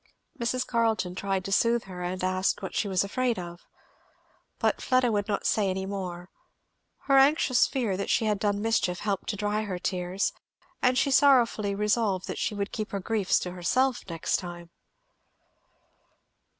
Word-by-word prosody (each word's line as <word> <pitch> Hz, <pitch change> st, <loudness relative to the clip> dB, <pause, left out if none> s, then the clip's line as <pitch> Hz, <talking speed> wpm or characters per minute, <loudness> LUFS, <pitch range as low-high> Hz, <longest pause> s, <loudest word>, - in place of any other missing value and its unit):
Mrs. 250 Hz, +2 st, -1 dB
Carleton 225 Hz, -6 st, 0 dB
tried 190 Hz, 0 st, -2 dB
to 195 Hz, -, -4 dB
soothe 230 Hz, +3 st, +2 dB
her 180 Hz, -2 st, -9 dB
and 180 Hz, +1 st, -3 dB
asked 185 Hz, +2 st, 0 dB
what 190 Hz, -, -5 dB
she 210 Hz, -, 0 dB
was 190 Hz, -1 st, +1 dB
afraid 240 Hz, +4 st, -1 dB
of. 175 Hz, -1 st, -8 dB, 0.9 s
But -, -, 0 dB
Fleda 255 Hz, -2 st, +2 dB
would 205 Hz, -1 st, 0 dB
not 210 Hz, -, -2 dB
say 205 Hz, -3 st, +2 dB
any 190 Hz, 0 st, -2 dB
more. 185 Hz, -2 st, -6 dB, 0.7 s
Her 275 Hz, -1 st, +4 dB
anxious 270 Hz, -2 st, +4 dB
fear 235 Hz, -8 st, -1 dB
that 200 Hz, -, -3 dB
she 225 Hz, -, +2 dB
had 210 Hz, -2 st, +1 dB
done 205 Hz, 0 st, 0 dB
mischief 205 Hz, -6 st, 0 dB
helped 200 Hz, -3 st, -2 dB
to 210 Hz, -, -1 dB
dry 210 Hz, +1 st, -1 dB
her 200 Hz, -4 st, -4 dB
tears, 180 Hz, +1 st, -2 dB, 0.5 s
and 250 Hz, 0 st, +3 dB
she 275 Hz, +1 st, +2 dB
sorrowfully 240 Hz, -7 st, +4 dB
resolved 210 Hz, -2 st, 0 dB
she 210 Hz, -, -2 dB
would 200 Hz, 0 st, -3 dB
keep 215 Hz, -2 st, -4 dB
her 200 Hz, -, -3 dB
griefs 205 Hz, -1 st, +1 dB
to 180 Hz, -, -4 dB
herself 245 Hz, +9 st, +1 dB
next 165 Hz, -1 st, -1 dB
time. 175 Hz, -2 st, -8 dB
200 Hz, 165 wpm, -27 LUFS, 185-230 Hz, 0.9 s, Her